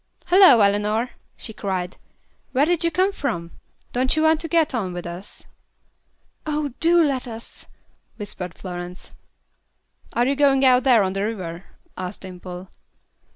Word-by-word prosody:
"Hallo, 355 - +7
Eleanor," 210 +4 +1 0.3
she 220 - -8
cried. 185 -4 -3 0.6
"Where 275 +2 +4
did 345 0 +1
you 335 - +3
come 370 +5 +2
from? 170 - -3 0.4
Don't 255 +3 +1
you 310 - +1
want 315 0 +4
to 330 - -4
get 320 -2 +2
on 195 -7 -2
with 175 0 -6
us?" 175 +3 -8 1.0
"Oh, 295 -3 -2
do 340 +1 +4
let 270 -4 -1
us," 230 -1 -9 0.5
whispered 190 -5 -6
Florence. 180 -1 -8 1.0
"Are 240 - +2
you 275 +2 +1
going 275 -1 +4
out 255 +1 +4
on 210 -7 +4
the 195 - -2
river?" 185 -5 -5 0.3
asked 185 +1 -6
Dimple. 180 0 -9
230 Hz, 145 wpm, -23 LUFS, 185-290 Hz, 1.0 s, Hallo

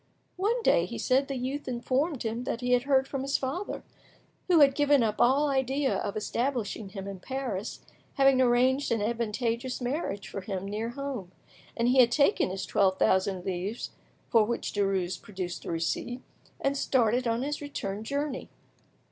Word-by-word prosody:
One 450 +6 0
day, - - +4
he - - -6
said, 270 +1 +2
the 275 - -3
youth 265 +3 -3
informed 260 +4 -1
him 230 +2 -2
that 235 - -3
he 250 0 -1
had 245 +1 +3
heard 270 -1 +3
from 270 -1 -3
his 275 +1 +1
father, 285 +10 -4 0.6
who 350 -3 +5
had 275 -1 +7
given 290 -2 +4
up 215 -1 0
all 275 +4 +4
idea 270 0 +1
of 200 - -3
establishing 225 -2 -2
him 195 0 -7
in 195 -2 -6
Paris, 240 -3 -4 0.3
having 270 -2 +5
arranged 255 +3 +3
an 230 - +2
advantageous 235 +2 -1
marriage 245 - -3
for 195 - -5
him 190 0 -4
near 215 +3 -3
home; 255 -8 -5 0.5
and 235 0 +2
he 255 +2 +4
had 240 -2 +7
taken 280 -6 +3
his 190 +1 -4
twelve 190 -2 +2
thousand 190 -1 +2
livres, 190 +5 -3 0.4
for 230 -3 +5
which 235 +2 -2
Derues 195 -3 0
produced 185 -3 -6
a - - -3
receipt, 170 +9 -2 0.4
and 275 0 0
started 245 -2 +2
on 230 +2 0
his 295 +1 -3
return 210 -8 -4
journey. 280 +2 -3
245 Hz, 175 wpm, -28 LUFS, 210-275 Hz, 0.6 s, had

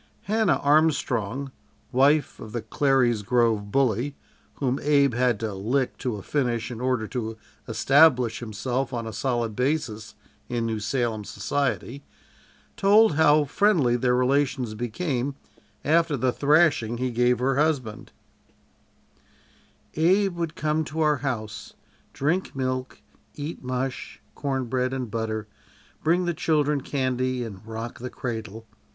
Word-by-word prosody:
Hannah 215 -2 +2
Armstrong, 140 -4 +1 0.4
wife 140 +4 +3
of 110 - -9
the 120 -2 -3
Clary's 125 -2 +2
Grove 110 -2 +1
bully, 135 +2 +1 0.4
whom 135 -1 -1
Abe 140 -3 +3
had 125 -2 +1
to 110 -2 -2
"lick" 120 +7 -1
to 125 -4 -2
a 100 - -8
finish 120 -5 -1
in 120 0 -6
order 125 -4 0
to 115 -3 -4 0.3
establish 125 0 +4
himself 125 +4 -3
on 115 -1 -3
a 110 - -6
solid 115 0 -1
basis 125 -5 -2 0.3
in 120 -2 -1
New 110 -1 -2
Salem 110 0 -1
society, 140 +3 -2 0.7
told 210 0 +5
how 150 0 +5
friendly 150 - +2
their 125 0 +2
relations 130 -2 +1
became 125 +4 -2 0.5
after 160 -1 +3
the 130 0 +1
thrashing 145 -6 +3
he 130 +1 -1
gave 125 +1 +2
her 130 +2 0
husband: 140 -8 -1 1.8
"Abe 190 +4 +3
would 170 -2 -3
come 155 +1 0
to 160 +2 -4
our 150 -1 +3
house, 115 -5 -4 0.4
drink 160 +6 -1
milk, 130 -1 -3 0.4
eat 150 +1 -6
mush, 130 +1 -4
cornbread 130 -2 -1
and 125 -4 -4
butter, 110 -1 -3 0.6
bring 175 +3 +2
the 175 - 0
children 150 -3 +1
candy 130 -2 -1
and 100 -4 -8
rock 115 +1 -6
the 125 +1 -5
cradle." 110 -3 -6
130 Hz, 130 wpm, -25 LUFS, 115-145 Hz, 1.8 s, told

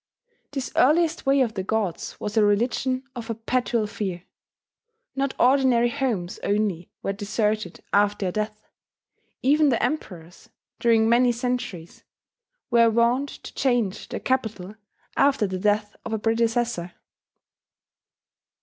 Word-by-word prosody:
This 270 -3 -4
earliest 315 +3 +3
Way 275 0 +4
of 235 -4 +1
the 195 - -3
Gods 200 -2 -2
was 210 +1 -4
a 220 - +5
religion 240 +5 +1
of 235 -2 -6
perpetual 230 0 -1
fear. 190 -4 -4 0.9
Not 275 0 -1
ordinary 250 -2 +4
homes 220 -10 -2
only 200 -4 -1
were 195 - -1
deserted 210 -2 -2
after 205 -1 +2
a - - -3
death: 215 +1 -4 0.8
even 295 +2 +4
the 235 - +1
Emperors, 180 - -4 0.3
during 225 -2 +4
many 240 +2 +4
centuries, 235 -8 -4 0.7
were 230 -1 +5
wont 235 +5 +2
to - - -11
change 240 -7 0
their - - -4
capital 220 -7 -2 0.4
after 275 -6 +3
the 185 -1 -3
death 210 +1 0
of 225 - -5
a - - +1
predecessor. 225 -4 0
225 Hz, 125 wpm, -24 LUFS, 205-250 Hz, 0.9 s, a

